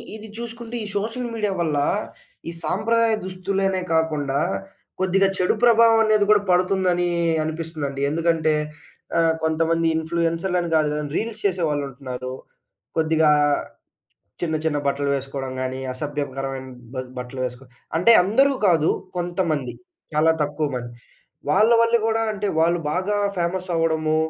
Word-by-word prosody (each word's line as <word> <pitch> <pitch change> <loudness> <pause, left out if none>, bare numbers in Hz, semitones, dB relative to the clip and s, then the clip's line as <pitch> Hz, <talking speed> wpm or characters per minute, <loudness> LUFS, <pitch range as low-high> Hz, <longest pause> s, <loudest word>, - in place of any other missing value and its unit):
ఇది 220 0 -9
చూసుకుంటే 235 0 -7
ఈ - - -5
సోషల్ 230 +4 -3
మీడియా 210 -3 -1
వల్ల, 155 -3 0 0.7
ఈ - - -3
సాంప్రదాయ 230 0 +2
దుస్తులనే 190 0 -1
కాకుండా 150 -4 +1 0.6
కొద్దిగా 190 +1 +3
చెడు 180 - +2
ప్రభావం 230 -1 +6
అనేది 215 -1 +3
కూడా 210 -1 +6
పడుతుందనీ 180 -1 +2 0.4
అనిపిస్తుందండి. 155 -3 -4
ఎందుకంటే 160 -1 +1 0.6
ఆహ్, 165 -1 +3
కొంతమంది 165 +1 +1
ఇన్‌ఫ్లూయెన్సర్‌లని 170 +2 -1
గాదు 155 -1 +3
గానీ 150 -1 -3
రీల్స్ 220 -1 -3
చేసేవాళ్ళు 165 -7 +1
ఉంటన్నారు. 130 -1 -6 0.6
కొద్దిగా 160 -1 +3 1.1
చిన్న, 160 -3 0
చిన్న 150 -2 +1
బట్టలు 140 0 0
వేసుకోడం 135 -1 -4
గానీ. 130 0 -3
అసభ్యకరమైన 135 -1 -4 0.3
బ 130 - -4 0.2
బట్టలు 125 +1 -6
వేసుకో 125 +1 -6 0.3
అంటే 185 +8 +6
అందరూ 260 +9 +3
కాదు. 165 -4 +4 0.3
కొంతమంది 175 -7 -1 0.4
చాలా 160 +2 +4
తక్కువ 150 +1 -1
మంది 120 -1 -5 0.6
వాళ్ళ 215 +4 +4
వల్ల 230 0 +4
గూడా 225 0 +1
అంటే, 205 -1 -2
వాళ్ళు 170 +2 +3
బాగా 190 +4 0 0.2
ఫేమస్ 180 +2 -1
అవ్వడము. 160 -1 +1
165 Hz, 125 wpm, -23 LUFS, 150-195 Hz, 1.1 s, ప్రభావం